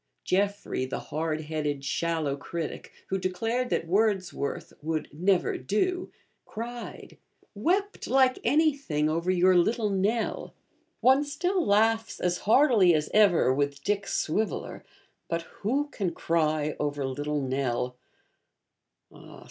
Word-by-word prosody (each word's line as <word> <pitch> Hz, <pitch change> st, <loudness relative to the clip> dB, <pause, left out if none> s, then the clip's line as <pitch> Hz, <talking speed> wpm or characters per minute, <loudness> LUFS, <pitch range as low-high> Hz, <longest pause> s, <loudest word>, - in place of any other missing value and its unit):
Jeffrey, 200 Hz, -7 st, 0 dB
the 130 Hz, -, -3 dB
hard 155 Hz, 0 st, -1 dB
headed 150 Hz, -3 st, -3 dB
shallow 160 Hz, -1 st, -1 dB
critic, 160 Hz, +3 st, -6 dB, 0.2 s
who 195 Hz, -, 0 dB
declared 225 Hz, +7 st, -1 dB
that -, -, 0 dB
Wordsworth 190 Hz, -5 st, -1 dB
'would 155 Hz, 0 st, -2 dB
never 180 Hz, +4 st, +1 dB
do,' 355 Hz, -, -1 dB, 0.3 s
cried, 235 Hz, +2 st, -8 dB, 0.3 s
'wept 370 Hz, -, -1 dB
like 260 Hz, 0 st, +3 dB
anything,' 280 Hz, -, +2 dB
over 170 Hz, +3 st, -1 dB
your 185 Hz, 0 st, +4 dB
Little 215 Hz, +4 st, +2 dB
Nell. 205 Hz, +4 st, -1 dB, 0.5 s
One 265 Hz, +4 st, +5 dB
still 355 Hz, +5 st, -1 dB
laughs 225 Hz, 0 st, +2 dB
as 180 Hz, 0 st, 0 dB
heartily 225 Hz, -, +6 dB
as 150 Hz, -1 st, -1 dB
ever 195 Hz, -11 st, +5 dB
with 140 Hz, +1 st, -1 dB
Dick 205 Hz, -1 st, -1 dB
Swiveller; 190 Hz, +1 st, -2 dB, 0.5 s
but 165 Hz, 0 st, -1 dB, 0.2 s
who 270 Hz, +8 st, 0 dB
can 190 Hz, -9 st, -3 dB
cry 155 Hz, -2 st, 0 dB
over 145 Hz, -1 st, -1 dB
Little 145 Hz, +3 st, -2 dB
Nell? 130 Hz, -2 st, -1 dB
185 Hz, 115 wpm, -27 LUFS, 155-225 Hz, 0.5 s, heartily